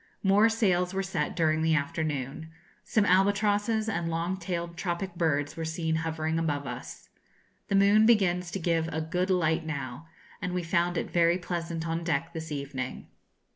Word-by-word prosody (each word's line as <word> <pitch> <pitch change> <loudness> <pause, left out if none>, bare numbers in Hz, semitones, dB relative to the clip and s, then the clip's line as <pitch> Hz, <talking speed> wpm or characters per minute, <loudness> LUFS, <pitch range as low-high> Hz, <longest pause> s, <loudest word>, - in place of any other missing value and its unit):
More 205 +3 +5
sails 190 -5 +1
were 195 - 0
set 190 -6 -2
during 155 -2 +2
the 160 0 +3
afternoon. 145 0 -2 0.3
Some 215 -3 +2
albatrosses 205 +3 +2
and 170 -6 -1
long 165 +3 -1
tailed 170 -2 -4
tropic 175 +1 -3
birds 150 -4 0
were 165 - -4
seen 160 0 -1
hovering 160 0 -1
about 145 -3 -1
us. 125 -1 -8 0.6
The 200 - 0
moon 205 +2 +5
begins 180 -6 +3
to 195 - -4
give 165 -1 +1
a 160 - -2
good 180 +4 -1
light 165 -3 +2
now, 140 -1 -5 0.3
and 180 - -3
we 180 - -1
found 175 0 +1
it - - -3
very 170 0 +4
pleasant 170 -2 -4
on 165 +1 -2
deck 165 0 -1
this 160 -1 -6
evening. 140 -3 -5
170 Hz, 170 wpm, -28 LUFS, 160-185 Hz, 0.6 s, More